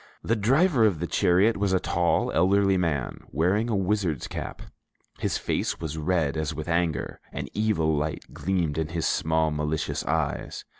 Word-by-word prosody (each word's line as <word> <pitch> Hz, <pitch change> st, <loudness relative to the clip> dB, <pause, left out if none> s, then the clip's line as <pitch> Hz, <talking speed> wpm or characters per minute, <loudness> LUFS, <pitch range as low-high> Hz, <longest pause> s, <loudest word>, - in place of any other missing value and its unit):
The 115 Hz, -, +1 dB
driver 130 Hz, -, +3 dB
of 100 Hz, -8 st, +3 dB
the 85 Hz, -, -1 dB
chariot 95 Hz, +5 st, +3 dB
was 100 Hz, -1 st, +1 dB
a 95 Hz, -, +3 dB
tall, 85 Hz, -1 st, +1 dB
elderly 95 Hz, +1 st, +3 dB
man, 80 Hz, -8 st, -1 dB
wearing 95 Hz, +9 st, +1 dB
a 110 Hz, -, +1 dB
wizard's 95 Hz, -6 st, 0 dB
cap; -, -, -6 dB, 0.6 s
his -, -, 0 dB
face -, -, -2 dB
was 80 Hz, -2 st, -4 dB
red 80 Hz, -2 st, 0 dB
as 80 Hz, 0 st, -2 dB
with 80 Hz, 0 st, -5 dB
anger, 85 Hz, -4 st, -1 dB
an -, -, -5 dB
evil 100 Hz, -8 st, +1 dB
light 75 Hz, +1 st, -2 dB
gleamed 85 Hz, -5 st, -1 dB
in 80 Hz, -, -1 dB
his 80 Hz, 0 st, -2 dB
small 80 Hz, 0 st, +1 dB
malicious 75 Hz, +1 st, -2 dB
eyes. -, -, -2 dB
85 Hz, 165 wpm, -26 LUFS, 80-100 Hz, 0.6 s, driver